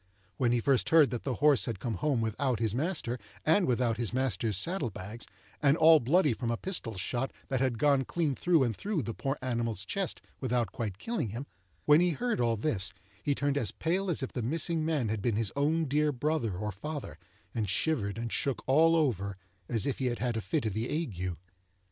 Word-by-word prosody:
When 120 Hz, -3 st, +2 dB
he 120 Hz, -, +2 dB
first 130 Hz, +2 st, +2 dB
heard 155 Hz, -7 st, +6 dB
that 120 Hz, -, -4 dB
the 130 Hz, -3 st, -1 dB
horse 140 Hz, -6 st, +4 dB
had 115 Hz, -5 st, -4 dB
come 115 Hz, +1 st, -3 dB
home 135 Hz, +1 st, +1 dB
without 115 Hz, +3 st, 0 dB
his 110 Hz, -3 st, +1 dB
master, 130 Hz, -3 st, -1 dB, 0.3 s
and 175 Hz, +5 st, +4 dB
without 120 Hz, -2 st, +1 dB
his 120 Hz, -3 st, 0 dB
master's 120 Hz, -5 st, +1 dB
saddle 150 Hz, -, 0 dB
bags, 105 Hz, +4 st, -7 dB, 0.3 s
and 145 Hz, +1 st, +4 dB
all 160 Hz, -1 st, +7 dB
bloody 145 Hz, +2 st, +3 dB
from 115 Hz, +1 st, -3 dB
a 115 Hz, -, 0 dB
pistol 160 Hz, -, -3 dB
shot, 120 Hz, +7 st, -2 dB, 0.2 s
that 130 Hz, -2 st, 0 dB
had 130 Hz, -3 st, 0 dB
gone 140 Hz, +1 st, +3 dB
clean 160 Hz, -2 st, 0 dB
through 165 Hz, +1 st, +3 dB
and 115 Hz, -4 st, 0 dB
through 195 Hz, -, -2 dB
the 115 Hz, -, -4 dB
poor 135 Hz, +5 st, -2 dB
animal's 115 Hz, -5 st, -2 dB
chest 190 Hz, -, -2 dB, 0.2 s
without 120 Hz, -5 st, 0 dB
quite 105 Hz, -5 st, -4 dB
killing 230 Hz, -, -2 dB
him; 120 Hz, +7 st, -5 dB, 0.4 s
when 150 Hz, +2 st, +6 dB
he 180 Hz, -, +3 dB
heard 240 Hz, +6 st, -1 dB
all 115 Hz, -2 st, +2 dB
this, 105 Hz, -5 st, +1 dB, 0.3 s
he 145 Hz, +4 st, 0 dB
turned 145 Hz, 0 st, 0 dB
as 110 Hz, -, 0 dB
pale 185 Hz, -, -1 dB
as 160 Hz, -5 st, 0 dB
if 130 Hz, -, -5 dB
the 125 Hz, -, -2 dB
missing 160 Hz, +6 st, +1 dB
man 155 Hz, -8 st, 0 dB
had 110 Hz, -1 st, -2 dB
been 115 Hz, 0 st, 0 dB
his 110 Hz, -2 st, -1 dB
own 155 Hz, +3 st, +1 dB
dear 150 Hz, +2 st, +2 dB
brother 130 Hz, -, -1 dB
or 105 Hz, +2 st, -3 dB
father, 105 Hz, -, -6 dB, 0.3 s
and 110 Hz, -4 st, -1 dB
shivered 105 Hz, -2 st, 0 dB
and 115 Hz, 0 st, -4 dB
shook 140 Hz, -2 st, -1 dB
all 160 Hz, +5 st, +5 dB
over 100 Hz, -, 0 dB, 0.3 s
as 115 Hz, 0 st, +2 dB
if 140 Hz, -, -2 dB
he 130 Hz, -, 0 dB
had 120 Hz, -1 st, -1 dB
had 120 Hz, -2 st, -1 dB
a 110 Hz, -, -1 dB
fit 150 Hz, +3 st, -1 dB
of 110 Hz, -, -1 dB
the 110 Hz, +4 st, -2 dB
ague. 95 Hz, -, -3 dB
130 Hz, 215 wpm, -30 LUFS, 115-150 Hz, 0.4 s, all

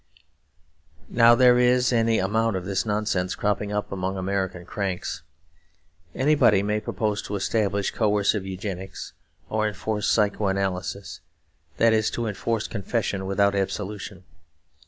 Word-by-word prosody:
Now 115 Hz, 0 st, +6 dB
there 125 Hz, 0 st, +5 dB
is 125 Hz, 0 st, +3 dB
any 115 Hz, -1 st, +3 dB
amount 110 Hz, +3 st, +1 dB
of 90 Hz, -1 st, -4 dB
this 100 Hz, +3 st, -1 dB
nonsense 105 Hz, -3 st, -1 dB
cropping 105 Hz, 0 st, -1 dB
up 105 Hz, 0 st, -3 dB
among 95 Hz, 0 st, -3 dB
American 95 Hz, -2 st, -2 dB
cranks. 95 Hz, -1 st, -3 dB, 0.9 s
Anybody 130 Hz, -8 st, +4 dB
may 105 Hz, +1 st, 0 dB
propose 105 Hz, -1 st, -2 dB
to 105 Hz, -, -5 dB
establish 100 Hz, -1 st, 0 dB
coercive 105 Hz, -2 st, +1 dB
Eugenics; 95 Hz, -1 st, -6 dB, 0.3 s
or 110 Hz, 0 st, 0 dB
enforce 105 Hz, +1 st, -2 dB
psychoanalysis 100 Hz, -2 st, -1 dB, 0.6 s
that 115 Hz, -1 st, +4 dB
is, 110 Hz, -1 st, +1 dB
enforce 115 Hz, -1 st, -2 dB
confession 100 Hz, -2 st, -2 dB
without 100 Hz, +1 st, +2 dB
absolution. 100 Hz, 0 st, -4 dB
105 Hz, 115 wpm, -25 LUFS, 95-110 Hz, 0.9 s, Now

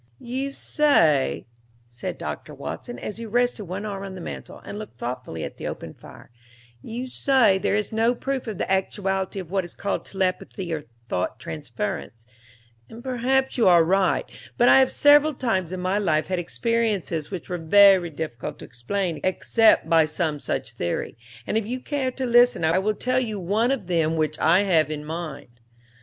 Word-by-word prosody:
"You 260 Hz, -, -4 dB
say," 165 Hz, -, +2 dB, 0.4 s
said 125 Hz, +10 st, -6 dB
Doctor -, -, -6 dB
Watson, 245 Hz, -, -6 dB
as 210 Hz, -, -6 dB
he 230 Hz, 0 st, -6 dB
rested 245 Hz, -1 st, 0 dB
one 190 Hz, +4 st, -5 dB
arm 200 Hz, -2 st, -4 dB
on 195 Hz, -1 st, -7 dB
the -, -, -8 dB
mantel -, -, -8 dB
and 205 Hz, -, -6 dB
looked 210 Hz, -, -9 dB
thoughtfully 120 Hz, -10 st, -5 dB
at -, -, -7 dB
the -, -, -5 dB
open -, -, -6 dB
fire, -, -, -15 dB, 0.5 s
"you 240 Hz, -, -5 dB
say 255 Hz, -6 st, +3 dB
there 195 Hz, -, +1 dB
is 210 Hz, -1 st, -1 dB
no 225 Hz, +2 st, +2 dB
proof 270 Hz, 0 st, -3 dB
of 215 Hz, -4 st, -4 dB
the -, -, -2 dB
actuality 190 Hz, 0 st, -1 dB
of 180 Hz, -2 st, -8 dB
what 190 Hz, -1 st, +1 dB
is 175 Hz, -, -11 dB
called 200 Hz, -, -2 dB
telepathy 185 Hz, -2 st, -2 dB
or 150 Hz, -2 st, -4 dB, 0.2 s
thought 90 Hz, +2 st, -2 dB
transference, 115 Hz, -, -5 dB, 0.6 s
and 230 Hz, +1 st, -11 dB
perhaps 265 Hz, +1 st, 0 dB
you 225 Hz, -, +5 dB
are 175 Hz, -2 st, +7 dB
right, 190 Hz, +1 st, +2 dB, 0.3 s
but 245 Hz, -, +4 dB
I -, -, +8 dB
have 260 Hz, -1 st, +4 dB
several 290 Hz, +1 st, +5 dB
times 190 Hz, -9 st, -1 dB
in 185 Hz, -, -4 dB
my 185 Hz, +3 st, 0 dB
life 160 Hz, -6 st, +1 dB
had 185 Hz, -1 st, 0 dB
experiences 205 Hz, -5 st, -1 dB
which 185 Hz, -4 st, -6 dB
were 180 Hz, -1 st, -3 dB
very 190 Hz, +1 st, +6 dB
difficult 150 Hz, -6 st, -6 dB
to -, -, -10 dB
explain 165 Hz, -, -3 dB
except 220 Hz, +2 st, +3 dB
by 165 Hz, -1 st, +5 dB
some 155 Hz, -1 st, -2 dB
such 115 Hz, -, -3 dB
theory, 85 Hz, -7 st, -3 dB, 0.3 s
and 220 Hz, -, +1 dB
if 215 Hz, -, -6 dB
you 250 Hz, +2 st, -3 dB
care 275 Hz, -1 st, -2 dB
to 260 Hz, +1 st, -4 dB
listen 240 Hz, -5 st, +4 dB
I 165 Hz, +3 st, +3 dB
will 210 Hz, +2 st, 0 dB
tell 255 Hz, +3 st, 0 dB
you 220 Hz, -5 st, -3 dB
one 205 Hz, +7 st, +1 dB
of 265 Hz, -8 st, -1 dB
them 165 Hz, -2 st, +1 dB
which 155 Hz, -1 st, -1 dB
I 170 Hz, +5 st, +4 dB
have 165 Hz, -6 st, +3 dB
in 150 Hz, -1 st, -5 dB
mind." 150 Hz, -7 st, -7 dB
190 Hz, 185 wpm, -24 LUFS, 160-230 Hz, 0.6 s, I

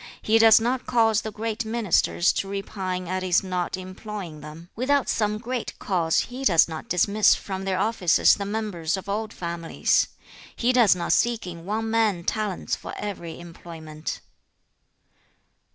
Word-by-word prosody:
He 225 Hz, +1 st, +4 dB
does 225 Hz, -1 st, +8 dB
not 245 Hz, +3 st, -1 dB
cause 225 Hz, -3 st, +3 dB
the 220 Hz, -, -5 dB
great 225 Hz, +2 st, -3 dB
ministers 220 Hz, -5 st, +1 dB
to 195 Hz, -, -2 dB
repine 190 Hz, -2 st, -4 dB
at 185 Hz, +1 st, -2 dB
his 185 Hz, 0 st, +2 dB
not 180 Hz, -1 st, -2 dB
employing 185 Hz, -3 st, -8 dB
them. 155 Hz, +4 st, -11 dB
Without 275 Hz, +4 st, +1 dB
some 210 Hz, -1 st, 0 dB
great 245 Hz, +2 st, -5 dB
cause, 170 Hz, -4 st, +1 dB
he 255 Hz, +2 st, -7 dB
does 170 Hz, -10 st, +5 dB
not 160 Hz, -2 st, -7 dB
dismiss 200 Hz, +4 st, +4 dB
from 190 Hz, -1 st, -6 dB
their 190 Hz, -1 st, 0 dB
offices 190 Hz, -4 st, +3 dB
the 200 Hz, -, -3 dB
members 200 Hz, -5 st, -2 dB
of 190 Hz, -, -8 dB
old 215 Hz, +2 st, -2 dB
families. 170 Hz, -3 st, 0 dB, 0.5 s
He 245 Hz, +2 st, +1 dB
does 235 Hz, -7 st, +5 dB
not 175 Hz, -1 st, 0 dB
seek 235 Hz, -3 st, +1 dB
in 170 Hz, -2 st, -8 dB
one 220 Hz, +3 st, -2 dB
man 215 Hz, -6 st, +1 dB
talents 210 Hz, 0 st, -2 dB
for -, -, -8 dB
every 170 Hz, -6 st, -6 dB
employment.' 165 Hz, -2 st, -8 dB
200 Hz, 155 wpm, -25 LUFS, 175-220 Hz, 0.5 s, does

